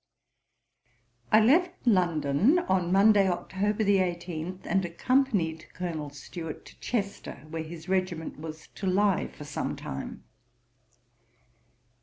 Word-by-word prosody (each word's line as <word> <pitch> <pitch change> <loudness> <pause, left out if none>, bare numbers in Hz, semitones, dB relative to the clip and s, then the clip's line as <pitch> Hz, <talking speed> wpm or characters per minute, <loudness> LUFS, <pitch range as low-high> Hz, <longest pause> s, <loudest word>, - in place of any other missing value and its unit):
I 215 - +8
left 345 +10 +3
London 175 - +3
on 185 - +1
Monday, 200 0 +5
October 200 +4 -1
18, 180 -2 0
and 190 +2 +1
accompanied 175 -3 0
Colonel 165 -5 -4
Stuart 155 +3 -8
to - - -15
Chester, 200 -8 -3
where 165 0 -3
his 160 +1 -9
regiment 185 -5 -1
was 155 0 -8
to 195 - -4
lye 195 0 +2
for - - -11
some 145 0 -3
time. 65 - -6
185 Hz, 110 wpm, -28 LUFS, 160-205 Hz, -, I